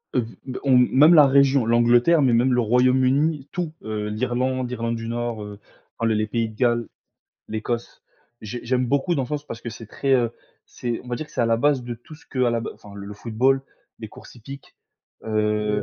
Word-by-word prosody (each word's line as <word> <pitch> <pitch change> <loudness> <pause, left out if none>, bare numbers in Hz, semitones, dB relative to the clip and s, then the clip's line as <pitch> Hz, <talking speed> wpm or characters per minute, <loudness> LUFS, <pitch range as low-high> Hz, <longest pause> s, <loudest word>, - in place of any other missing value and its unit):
Heu, 125 - +2 0.2
b 130 -1 -6
on 135 -2 +4
même 140 +6 +6
la 150 -4 +8
région, 135 -2 +4
l'Angleterre, 120 +7 +4
mais 130 -3 +3
même 125 +3 +3
le 125 - +2
Royaume-Uni, 130 +5 +2
tout, 175 -3 -3
heu, 105 -1 -4
l'Irlande 125 +3 -1
l'Irlande 115 -1 -2
du 115 0 -6
Nord, 120 -2 -3
heu, 105 0 -9 0.4
enfin 115 - 0
le 110 - +1
les 110 0 0
pays 115 +1 -1
de 110 - -14
Galles, 120 0 +1 0.6
l'Écosse. 115 +2 -4 0.4
J'ai 120 +3 -6
j'aime 125 +1 0
beaucoup 140 +7 +1
dans 135 -4 -1
ce - - -12
sens 150 -1 -4
parce 115 - -7
que 120 - -5
c'est 115 0 -10
très, 135 +5 -2
heu, 120 -3 +2 0.4
c'est, 120 -2 -4
on 125 - -14
va 120 - -2
dire 155 - -5
que - - -21
c'est - - -2
à 120 - +2
la 115 0 +2
base 140 +1 +2
de 120 0 -5
tout 120 +7 -14
ce 150 - -18
que 130 -3 -1
à 120 - +2
la 115 0 0
b - - -5
enfin 100 -1 -14
le 100 +1 -8
football, 125 +5 +1 0.4
les - - -7
courses - - -14
hippiques, 135 +4 -12 0.5
heu 105 -1 0
120 Hz, 225 wpm, -23 LUFS, 115-130 Hz, 0.6 s, la